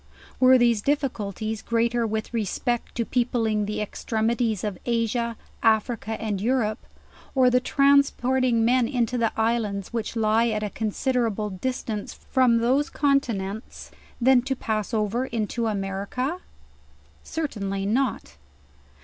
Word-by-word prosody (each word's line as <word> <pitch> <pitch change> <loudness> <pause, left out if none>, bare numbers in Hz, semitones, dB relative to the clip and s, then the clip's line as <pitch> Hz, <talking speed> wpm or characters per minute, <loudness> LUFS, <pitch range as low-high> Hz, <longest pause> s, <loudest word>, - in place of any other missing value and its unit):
Were 255 0 +7
these 235 -3 +3
difficulties 220 -6 -2
greater 235 0 +1
with 220 +2 -3
respect 235 +2 -2
to 235 - -1
peopling 225 -4 0
the 210 - -3
extrem 220 +1 -1
ities 230 -5 -1
of 205 -4 -3
Asia, 235 0 -1 0.2
Africa 220 0 +1
and 205 -3 -2
Europe, 230 -1 +1 0.6
or 255 -1 +5
the 250 - +4
transporting 260 -3 +3
men 245 0 +3
into 245 -2 0
the 230 -1 +2
islands 220 -3 -1
which 230 0 -3
lie 225 +1 +3
at 215 -2 -1
a 210 - -3
considerable 220 -1 -1
distance 220 0 -4
from 255 -3 +2
those 255 +5 +2
continents, 230 -8 -1 0.3
than 255 0 +5
to 270 +2 -2
pass 215 -4 -2
over 225 +3 0
into 230 0 -2
America? 205 - -2 0.8
Certainly 200 -11 -3
not. 240 - -1
230 Hz, 125 wpm, -25 LUFS, 215-250 Hz, 0.8 s, Were